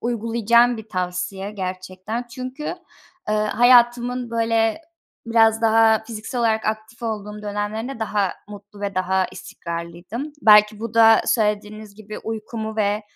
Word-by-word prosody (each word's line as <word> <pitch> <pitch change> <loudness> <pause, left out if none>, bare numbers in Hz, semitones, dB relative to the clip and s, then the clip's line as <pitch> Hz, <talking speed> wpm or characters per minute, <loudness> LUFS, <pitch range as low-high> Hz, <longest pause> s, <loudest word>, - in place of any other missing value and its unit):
uygulayacağım 235 +1 +2
bir 220 -1 -10
tavsiye 185 +1 -3
gerçekten. 185 +4 -5
Çünkü, 255 +4 -7 0.7
eee, 215 - +1
hayatımın, 240 +2 +3
böyle, 230 +2 +1 0.5
biraz 225 -1 +3
daha 225 0 +4
fiziksel 225 +2 -6
olarak 220 -1 +1
aktif 220 +2 -4
olduğum 210 -2 -5
dönemlerinde 210 +5 -4
daha 205 -3 0 0.2
mutlu 205 0 -12
ve 200 -1 -3
daha 185 0 +1
istikrarlıydım. 170 - -7
Belki 210 0 +6
bu 230 -1 -6
da 225 -1 +7
söylediğiniz 210 -1 -1
gibi 215 0 -9
uykumu 220 0 -5
ve 210 0 0
220 Hz, 125 wpm, -22 LUFS, 205-230 Hz, 0.7 s, da